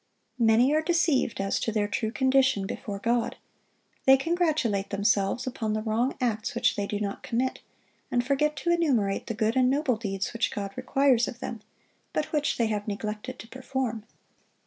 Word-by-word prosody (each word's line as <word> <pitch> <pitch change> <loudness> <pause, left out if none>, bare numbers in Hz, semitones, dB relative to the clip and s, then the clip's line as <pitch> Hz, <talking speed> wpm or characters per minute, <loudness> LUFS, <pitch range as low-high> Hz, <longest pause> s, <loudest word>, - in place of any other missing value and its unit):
Many 230 +4 +4
are 310 - +3
deceived 320 - +1
as 195 0 0
to 225 - -1
their 210 -1 0
true 220 +1 -1
condition 260 -5 +2
before 200 +1 -5
God. 235 +3 0 0.7
They 265 0 +8
congratulate 305 - 0
themselves 200 +3 +1
upon 230 -4 -2
the 215 0 -2
wrong 230 +4 0
acts 230 -2 -1
which 245 +1 +2
they 205 -2 -2
do 205 - -2
not 200 -1 -3
commit, 250 +3 -1 0.5
and 245 0 +1
forget 300 +3 +1
to 295 +5 -1
enumerate 260 -13 +1
the 230 - -3
good 220 +1 +1
and 255 -1 +4
noble 270 -3 +1
deeds 195 -3 -3
which 230 0 0
God 200 -1 -4
requires 255 -1 +2
of 235 - -7
them, 235 -4 -6 0.5
but 305 - -2
which 295 -1 +1
they 235 - +2
have 210 -1 -2
neglected 210 +4 -4
to 225 - -10
perform. 260 -3 -3
235 Hz, 175 wpm, -27 LUFS, 210-265 Hz, 0.7 s, They